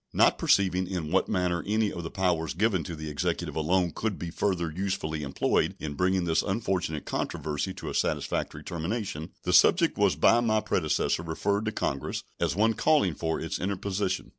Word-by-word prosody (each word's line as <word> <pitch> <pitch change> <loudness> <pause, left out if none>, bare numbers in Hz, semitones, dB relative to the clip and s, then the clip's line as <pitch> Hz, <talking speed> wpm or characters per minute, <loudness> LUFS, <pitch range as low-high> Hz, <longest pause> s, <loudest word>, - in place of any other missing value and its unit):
Not - - +4
perceiving 95 -2 +3
in 85 -5 -4
what 95 - +2
manner 90 -3 0
any 110 0 +1
of 85 - -5
the 80 - -5
powers 85 -5 0
given 100 -2 +1
to 85 - -5
the 80 0 -6
Executive 75 -1 -2
alone 85 +3 +1
could 110 +1 -2
be 85 -1 -5
further 85 -3 -1
usefully 85 -3 -2
employed 70 -1 0
in 75 -2 -5
bringing 90 +4 +1
this 80 -2 +2
unfortunate 95 -7 -2
controversy 75 +5 -2
to - - -8
a - - -3
satisfactory - - -1
termination, 85 -1 -4
the 90 - 0
subject 165 - +5
was 100 -2 +4
by 115 - +5
my 110 -2 +2
predecessor 85 -6 0
referred 100 +6 -1
to 110 - 0
Congress 70 -9 -2 0.2
as 70 - 0
one 110 +3 +3
calling 140 - +3
for 80 +1 -2
its - - -3
interposition. 95 0 -2
90 Hz, 180 wpm, -28 LUFS, 80-100 Hz, 0.2 s, subject